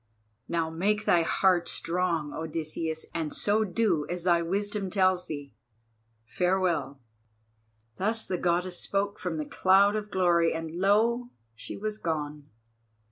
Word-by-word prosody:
Now 165 -1 -1
make 205 +6 0
thy 170 - +4
heart 175 +1 +2
strong, 170 -4 -1
Odysseus, 160 0 -4
and 160 -3 -2
so 210 +2 +1
do 185 -6 0
as 175 -1 -3
thy 170 -2 +3
wisdom 200 +3 -2
tells 185 -2 +2
thee. 145 -2 -7 0.7
Farewell!" 170 -3 0 1.0
Thus 220 +4 0
the 180 -2 -2
Goddess 175 +1 0
spoke 200 +1 -1
from 180 -3 -3
the 155 - -2
cloud 195 +5 +4
of 210 -1 -3
glory, 170 -4 +2
and 160 -1 -4
lo! 220 +7 +2 0.2
she 110 - -8
was 215 +1 -4
gone. 150 -3 -3
180 Hz, 135 wpm, -28 LUFS, 160-200 Hz, 1.0 s, thy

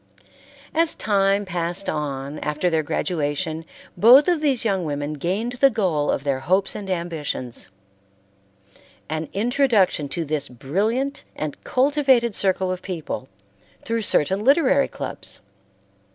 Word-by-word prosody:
As 325 0 +2
time 200 -1 +1
passed 175 +1 -2
on 145 -1 -3
after 150 +4 -1
their 160 -1 +2
graduation, 155 0 -2 0.3
both 245 +10 +7
of 345 -4 +2
these 270 -6 +1
young 195 -4 +1
women 145 -1 -3
gained 185 - -2
the 265 +3 +4
goal 175 - 0
of 135 - 0
their 140 -2 0
hopes 185 +8 +1
and 200 -2 -7
ambitions: 160 - -4 1.4
an 155 0 -3
introduction 215 - +2
to 170 +1 -3
this 145 -1 -2
brilliant 215 - -1
and 155 -2 -5
cultivated 260 -4 +2
circle 190 -1 +1
of 185 0 -4
people 165 -8 -5 0.5
through 230 0 -1
certain 190 0 +2
literary 275 +1 +4
clubs. - - -5
185 Hz, 125 wpm, -23 LUFS, 150-230 Hz, 1.4 s, both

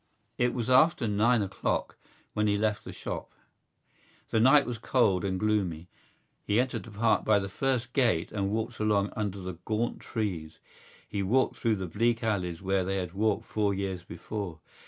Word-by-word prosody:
It 125 0 +2
was 120 -2 -2
after 130 +1 +4
nine 110 +2 +3
o'clock 95 - -2 0.4
when 105 0 +1
he 100 0 +2
left 105 0 0
the - - -6
shop. - - -6 1.0
The 110 - +3
night 135 +5 +6
was 120 -2 -4
cold 110 -7 +2
and 95 -1 -1
gloomy. 95 -6 0 0.5
He 105 +3 +2
entered 130 +1 0
the - - -10
Park 110 +2 +2
by 110 -1 +4
the 95 -1 -1
first 130 +3 -1
gate 115 -11 +2
and 100 -2 -1
walked 110 +2 -2
along 105 -2 +1
under 100 -2 -2
the 90 -3 -6
gaunt 115 +3 -1
trees. 90 -9 -4 0.5
He 100 - -2
walked 120 +8 +2
through 115 -2 +1
the 95 -2 -4
bleak 115 +6 0
alleys 90 -5 -1
where 95 0 +1
they 95 +2 -1
had 90 -2 -3
walked 105 +1 0
four 105 -2 0
years 95 -2 -3
before. 95 -2 -6
105 Hz, 175 wpm, -29 LUFS, 95-115 Hz, 1.0 s, night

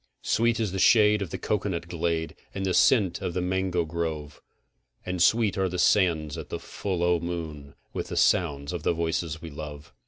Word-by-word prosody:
Sweet 115 0 +2
is 110 -4 0
the 95 - -3
shade 105 0 +5
of 95 - -3
the - - -4
cocoanut 95 -5 -2
glade, 85 -1 -2 0.2
and 95 -1 -2
the 95 - 0
scent 100 -2 +3
of 85 - -3
the - - +1
mango 90 -1 0
grove, 80 -3 -4 0.6
And 90 -1 -2
sweet 110 +1 +3
are 95 -1 +1
the 90 - -4
sands 85 -5 +2
at - - -8
the - - -3
full 95 -4 -3
o' 85 -1 +3
the 85 - -6
moon 75 -5 -6 0.2
with - - -3
the - - -5
sound 70 -4 +2
of 85 - -3
the 85 - +1
voices 80 0 -2
we 80 - -7
love. 75 -1 -8
85 Hz, 205 wpm, -27 LUFS, 80-95 Hz, 0.6 s, shade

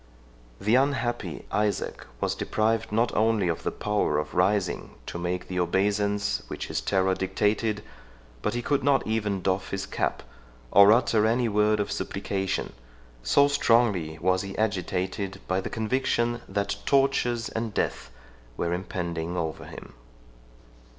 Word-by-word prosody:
The 105 +3 +1
unhappy 130 -2 0
Isaac 105 -1 -1
was - - 0
deprived 110 0 0
not 115 +2 +1
only 110 -3 +2
of 85 - -1
the - - -1
power 105 -8 0
of 75 0 -3
rising 95 +1 0
to 85 - -5
make 90 +1 -3
the 90 0 -2
obeisance 100 +3 +1
which - - -6
his - - -1
terror 95 -1 +2
dictated, 105 +3 0 0.6
but - - -1
he 120 - -2
could 140 0 +1
not 140 -1 +3
even 105 -4 -1
doff 95 0 0
his 95 0 -3
cap, - - -2 0.5
or 100 +1 +8
utter 115 -2 +4
any 120 +2 +2
word 105 0 +2
of 105 - -1
supplication; 95 -1 -2 0.5
so 140 - +4
strongly 115 - +2
was 95 +2 +1
he 100 -1 -7
agitated 95 -1 -2
by 95 +1 +1
the - - -5
conviction 120 +1 0
that 100 0 -1
tortures 135 -4 +2
and 115 0 -3
death - - -1 0.5
were 85 0 -1
impending 85 -2 -3
over 80 -2 -3
him. - - -11
105 Hz, 145 wpm, -27 LUFS, 95-115 Hz, 0.6 s, or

